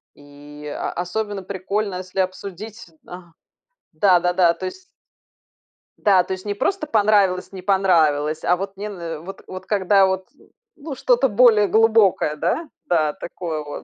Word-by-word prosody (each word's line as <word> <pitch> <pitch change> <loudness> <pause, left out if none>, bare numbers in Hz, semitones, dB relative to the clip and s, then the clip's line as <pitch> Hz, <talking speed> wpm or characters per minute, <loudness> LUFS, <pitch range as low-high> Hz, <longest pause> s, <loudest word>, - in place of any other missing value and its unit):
И 145 +1 -14 0.3
особенно 195 +2 -3
прикольно, 195 +1 -3
если 185 +1 -6
обсудить, 200 +3 -6 0.2
а, 175 -1 -11 0.6
да-да-да, 180 0 +3
то 185 - -6
есть. 375 - -8 1.1
Да, 190 -3 +4
то 190 - -4
есть 185 +2 -8
не 205 - -2
просто 310 - -1
понравилось, 205 -5 +2
не 190 -1 -8
понравилось, 160 -6 +2
а 180 - +3
вот 195 +1 -6
мне 210 +1 -5
н 170 -5 -7
вот 195 - -9
вот 185 0 -8
когда 195 -1 +3
вот, 190 0 -2 0.5
ну, 285 -2 -7
что-то 480 - +2
более 210 -2 +5
глубокое, 220 -8 +3
да? 225 - -2 0.2
Да, 155 -4 +1
такое 165 -3 -6
вот. 145 - -8
190 Hz, 145 wpm, -21 LUFS, 175-205 Hz, 1.1 s, более